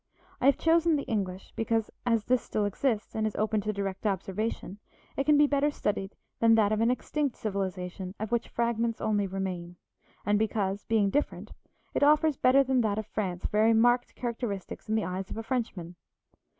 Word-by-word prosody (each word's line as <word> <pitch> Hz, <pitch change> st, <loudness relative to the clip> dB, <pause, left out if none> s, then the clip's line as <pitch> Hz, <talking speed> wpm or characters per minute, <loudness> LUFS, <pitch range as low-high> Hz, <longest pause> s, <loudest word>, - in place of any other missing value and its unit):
I 260 Hz, -, +4 dB
have 280 Hz, -, +5 dB
chosen 330 Hz, 0 st, +3 dB
the 285 Hz, -, -1 dB
English 195 Hz, -5 st, -3 dB
because, 225 Hz, -1 st, 0 dB, 0.2 s
as 230 Hz, -3 st, +2 dB
this 255 Hz, -1 st, +2 dB
still 210 Hz, -, -1 dB
exists 220 Hz, +2 st, -1 dB
and 220 Hz, 0 st, 0 dB
is 215 Hz, -, -5 dB
open 215 Hz, 0 st, 0 dB
to 215 Hz, -, -1 dB
direct 200 Hz, 0 st, -3 dB
observation, 200 Hz, +1 st, -3 dB, 0.4 s
it 275 Hz, -, -1 dB
can 300 Hz, -1 st, +5 dB
be 295 Hz, -, +6 dB
better 285 Hz, 0 st, +2 dB
studied 205 Hz, -8 st, -3 dB, 0.2 s
than 225 Hz, 0 st, +5 dB
that 215 Hz, -2 st, +3 dB
of 215 Hz, 0 st, +1 dB
an 230 Hz, -, +3 dB
extinct 280 Hz, +2 st, -1 dB
civilization 190 Hz, -2 st, -4 dB
of 215 Hz, +1 st, -4 dB
which 235 Hz, -1 st, 0 dB
fragments 235 Hz, -1 st, -1 dB
only 205 Hz, -2 st, 0 dB
remain; 185 Hz, -2 st, -4 dB, 0.5 s
and 205 Hz, +1 st, +2 dB
because, 205 Hz, -2 st, -1 dB
being 210 Hz, -3 st, +2 dB
different, 290 Hz, -, -2 dB, 0.4 s
it -, -, 0 dB
offers 300 Hz, +1 st, +4 dB
better 260 Hz, +2 st, +5 dB
than 260 Hz, -1 st, +2 dB
that 210 Hz, -2 st, 0 dB
of 220 Hz, -, -2 dB
France 185 Hz, -4 st, -3 dB
very 220 Hz, +2 st, +4 dB
marked 245 Hz, +2 st, +3 dB
characteristics 225 Hz, -5 st, -5 dB
in 220 Hz, -, +1 dB
the 220 Hz, -, +1 dB
eyes 185 Hz, +1 st, -4 dB
of -, -, -6 dB
a 225 Hz, -, -4 dB
Frenchman. 220 Hz, -8 st, -3 dB
220 Hz, 190 wpm, -29 LUFS, 200-245 Hz, 0.5 s, be